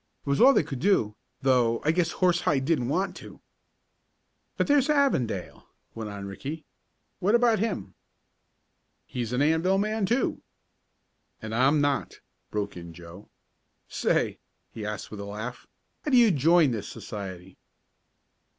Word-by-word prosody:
It - - -4
was 140 - +1
all 265 +3 +9
they 275 - +3
could 140 -4 -6
do, 135 - +2 0.3
though 125 -3 +3
I 155 - +4
guess 170 0 0
Horsehide 170 -7 +1
didn't 145 -6 +1
want 185 +7 -1
to." - - -12 1.2
"But - - +2
there's 285 -1 +3
Avondale," 135 - 0 0.3
went 110 -2 -6
on 100 -1 -7
Ricky. 140 +11 -6 0.5
"What 205 +5 +3
about 235 -3 +3
him?" 215 -2 -3 1.1
"He's 120 -2 -4
an 125 +3 +1
Anvil 160 +5 +2
man, 215 0 0
too." 240 +5 0 1.0
"And 110 0 -7
I'm 135 +5 +3
not," 145 -1 -1 0.3
broke 105 -1 -3
in 85 -1 -9
Joe. 90 +4 -12 0.6
"Say," - - 0 0.3
he 105 -2 -6
asked 105 -1 -6
with 105 - -7
a 100 - -5
laugh, 110 +5 -7 0.4
"how - - -2
do 260 - +5
you 235 -3 +6
join 160 0 +4
this 110 -3 -4
society?" 95 -4 -8
140 Hz, 145 wpm, -27 LUFS, -, 1.2 s, all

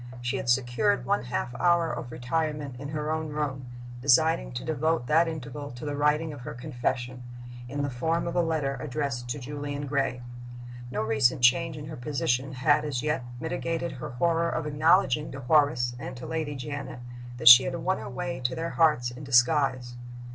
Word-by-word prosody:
She 120 0 -2
had 125 - -4
secured 120 +11 +2
one 200 -10 0
half 120 0 -3
hour 170 -2 +3
of 120 - -6
retirement 150 +1 -2
in 140 - -6
her 150 0 -3
own 160 0 -2
room, 140 -4 -3 0.3
designing 130 - +3
to - - -5
devote 160 -1 0
that 160 +6 +3
interval 145 -2 -6
to 120 +4 -8
the 145 -1 -3
writing 150 +2 +1
of 140 - -10
her 120 - -7
confession, 125 -1 -3 0.5
in 145 +2 -3
the 140 - -1
form 160 +7 -1
of 170 - -4
a 175 - +4
letter 155 -5 -1
addressed 130 -4 -3
to 120 - -2
Julian 145 +1 -5
Gray. 135 -3 -1 0.7
No 125 - -2
recent 120 +3 +2
change 160 +5 +4
in 150 - -7
her 155 +1 -8
position 130 0 -1
had, 145 +3 +3
as 140 -4 -3
yet, 150 -4 -1 0.2
mitigated 165 +3 -3
her 130 - -7
horror 165 +6 +1
of 160 - -2
acknowledging 150 -1 +2
to 135 - -6
Horace 125 -3 +3
and 130 +1 -7
to 125 - -8
Lady 155 -3 -3
Janet 140 0 -6 0.4
that 120 -1 -2
she 125 +1 +11
had 135 - -2
won 190 0 -1
her - - -7
way 130 +1 -4
to 125 0 -1
their 165 +1 -3
hearts 150 -7 +2
in 125 +4 -10
disguise. 130 -1 +2
140 Hz, 190 wpm, -27 LUFS, 125-155 Hz, 0.7 s, she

